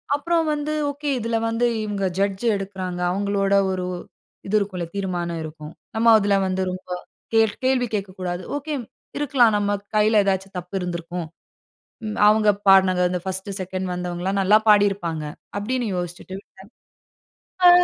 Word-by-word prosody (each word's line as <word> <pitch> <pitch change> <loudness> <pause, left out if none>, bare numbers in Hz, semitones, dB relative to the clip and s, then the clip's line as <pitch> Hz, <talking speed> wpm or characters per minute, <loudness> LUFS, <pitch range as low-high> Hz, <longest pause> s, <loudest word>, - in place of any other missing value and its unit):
அப்புறம் 330 +2 +1
வந்து 300 +1 -2 0.2
ஓகே 285 +1 -4
இதில 230 0 -1
வந்து 230 +2 +1 0.2
இவங்க 205 -2 -2
ஜட்ஜ் 195 +2 0
எடுக்குறாங்க, 190 -2 -5
அவங்களோட 200 +1 0 0.2
ஒரு 185 -1 -2 0.6
இது 210 - 0
இருக்கும்ல, 185 -4 -3
தீர்மானம் 175 -4 -2
இருக்கும். 155 0 -9 0.2
நம்ம 230 +1 +5
அதில 200 -1 +2
வந்து 185 0 -1
ரொம்ப 185 0 -8 0.4
கே 225 - +5 0.3
கேள்வி 255 -2 +2
கேட்கக்கூடாது. 185 -2 -4
ஓகே 295 +1 -4 0.4
இருக்கலாம், 260 -6 +4
நம்ம 205 0 0 0.2
கையில 215 0 +4
ஏதாச்சும் 195 0 -1
தப்பு 180 +2 -7
இருந்திருக்கும். 175 -1 -4 0.8
ம் 215 - -4
அவங்க 215 0 +5 0.2
பாடினங்க 185 -1 +6
அந்த 180 -1 -2
ஃபர்ஸ்ட்டு 190 +1 -3
செகண்ட் 185 0 -3
வந்தவங்கலாம் 180 +2 -2
நல்லா 205 +3 +5
பாடியிருப்பாங்க. 195 -7 +3 0.3
அப்டின்னு 240 +2 -1
யோசிச்சுட்டு 175 +1 -5
விட்டேன். 190 -1 -18 1.0
ஆ - - +11
195 Hz, 140 wpm, -23 LUFS, 180-215 Hz, 1.0 s, ஆ